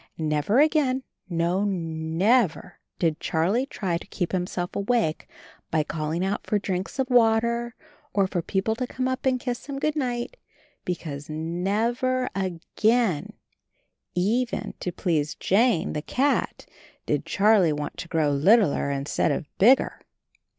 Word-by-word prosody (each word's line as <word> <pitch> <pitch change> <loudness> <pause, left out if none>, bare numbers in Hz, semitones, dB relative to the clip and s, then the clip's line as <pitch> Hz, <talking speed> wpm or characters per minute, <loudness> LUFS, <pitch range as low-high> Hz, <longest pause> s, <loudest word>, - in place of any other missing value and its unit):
Never 155 - +1
again, 285 -4 +3 0.3
no 170 +3 +1
never 175 +2 0 0.2
did 160 -3 0
Charlie 195 +12 0
try 180 -10 -2
to - - -13
keep 175 -3 -3
himself 180 -1 -2
awake 200 -6 0 0.4
by 155 -1 +1
calling 160 +3 -2
out 200 +1 -2
for 210 - +2
drinks 190 0 -3
of 265 -1 0
water, 235 0 +3 0.4
and 200 -2 +3
for 180 -2 -2
people 195 +5 -1
to 255 - -2
come 255 +1 -2
up 260 +1 -2
and 255 -1 +2
kiss 245 0 -4
him 280 -1 -4
"Good 305 +2 0
night" 250 - -2 0.2
— - - -36
because 150 -5 -5
NEVER 210 +11 -1
AGAIN, 195 +1 0 0.8
even 225 +7 0
to 180 - -3
please 160 -4 -1
Jane, 220 -1 +2
the 150 - -2
cat, 275 - 0 0.4
did - - 0
Char 210 -1 +4
he 165 - +3
want 145 0 -4
to - - -6
grow 160 -3 +1
littler 160 +1 +3
instead 140 +2 0
of 145 +1 -4
bigger. 245 +7 +4
195 Hz, 145 wpm, -25 LUFS, 165-240 Hz, 0.8 s, Char